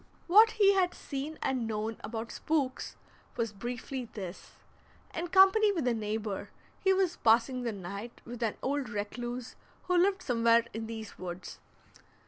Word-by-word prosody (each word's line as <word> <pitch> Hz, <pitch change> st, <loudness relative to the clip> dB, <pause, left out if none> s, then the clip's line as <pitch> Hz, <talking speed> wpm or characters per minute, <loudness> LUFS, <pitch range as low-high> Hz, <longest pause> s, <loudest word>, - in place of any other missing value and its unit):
What 435 Hz, +5 st, +7 dB
he 405 Hz, -3 st, +5 dB
had 370 Hz, -2 st, +2 dB
seen 285 Hz, +3 st, -5 dB
and 255 Hz, -4 st, 0 dB
known 220 Hz, 0 st, -2 dB
about 225 Hz, +1 st, -5 dB
spooks 285 Hz, -5 st, -1 dB, 0.4 s
was 230 Hz, -3 st, -1 dB
briefly 245 Hz, +4 st, -5 dB
this: 190 Hz, -4 st, -7 dB, 0.6 s
In 340 Hz, +2 st, -3 dB
company 385 Hz, +4 st, +6 dB
with 325 Hz, -10 st, -1 dB
a 245 Hz, -, +3 dB
neighbor 215 Hz, -2 st, -3 dB, 0.3 s
he 385 Hz, -, +3 dB
was 375 Hz, -2 st, +2 dB
passing 235 Hz, +3 st, +3 dB
the 240 Hz, -2 st, -1 dB
night 200 Hz, +4 st, -7 dB
with 245 Hz, 0 st, -8 dB
an 225 Hz, -3 st, 0 dB
old 275 Hz, -2 st, -1 dB
recluse 240 Hz, +4 st, -4 dB, 0.3 s
who 360 Hz, -, 0 dB
lived 385 Hz, +2 st, +3 dB
somewhere 230 Hz, -1 st, +4 dB
in 225 Hz, +1 st, -4 dB
these 220 Hz, -2 st, -7 dB
woods. 180 Hz, 0 st, -7 dB
240 Hz, 150 wpm, -31 LUFS, 220-335 Hz, 0.6 s, What